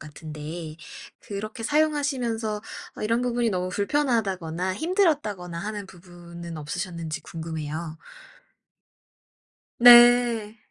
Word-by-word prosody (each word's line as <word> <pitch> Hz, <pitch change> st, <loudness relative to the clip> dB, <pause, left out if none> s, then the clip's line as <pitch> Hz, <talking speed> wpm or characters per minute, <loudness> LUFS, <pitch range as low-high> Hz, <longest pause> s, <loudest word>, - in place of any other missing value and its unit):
같은데 155 Hz, +1 st, -8 dB, 0.4 s
그렇게 215 Hz, +4 st, -6 dB
사용하시면서 260 Hz, -7 st, 0 dB, 0.4 s
어 -, -, -7 dB
이런 230 Hz, +3 st, +1 dB
부분이 240 Hz, -1 st, 0 dB
너무 180 Hz, -2 st, -2 dB
불편하다거나 190 Hz, -, -1 dB
힘들었다거나 285 Hz, -, 0 dB
하는 205 Hz, +1 st, -5 dB
부분은 170 Hz, -2 st, -11 dB
없으셨는지 160 Hz, +1 st, -5 dB
궁금해요. 160 Hz, 0 st, -6 dB, 1.8 s
네. 240 Hz, -2 st, +7 dB
200 Hz, 265 characters per minute, -25 LUFS, 170-240 Hz, 1.8 s, 네